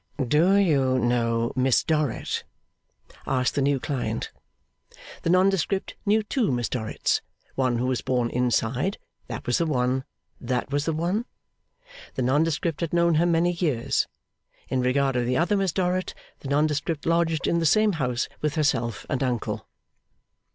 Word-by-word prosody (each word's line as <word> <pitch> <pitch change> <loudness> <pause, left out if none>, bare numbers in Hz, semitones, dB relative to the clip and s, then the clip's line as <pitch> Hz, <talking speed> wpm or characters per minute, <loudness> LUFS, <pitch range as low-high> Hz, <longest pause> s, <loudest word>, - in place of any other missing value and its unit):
'Do 150 +8 +3
you 140 -10 +3
know 115 -1 +1
Miss 130 -1 +3
Dorrit?' 150 -6 -1 0.8
asked 130 -1 +1
the 140 - 0
new 140 0 +2
client. 125 -6 -3 0.9
The - - -1
nondescript 190 +1 +2
knew 215 +2 +3
two 225 - 0
Miss 120 -1 -1
Dorrits; 110 -4 -1 0.3
one 130 -3 +1
who 120 - -1
was 130 -1 0
born 125 -2 0
inside 125 - 0 0.3
That 115 -1 -6
was 120 - +1
the 170 - +1
one! 130 -2 0 0.4
That 125 +2 -2
was 145 +1 0
the 160 - 0
one? 175 +9 -1 0.9
The 130 - -1
nondescript 150 +4 +1
had 170 -1 -2
known 170 0 +3
her 175 - +3
many 170 +1 +3
years. 155 -9 0 0.6
In 130 - 0
regard 135 +1 +1
of 120 -1 0
the 125 +1 +1
other 180 +5 +2
Miss 195 -3 +1
Dorrit, 185 0 -1 0.2
the - - -8
nondescript 150 +1 0
lodged 165 -2 +1
in 170 - +2
the 165 - 0
same 215 +7 +4
house 125 -8 -1
with 150 -1 -1
herself 120 -7 0
and 130 - -2
uncle. 125 -4 -2
140 Hz, 155 wpm, -25 LUFS, 125-170 Hz, 0.9 s, same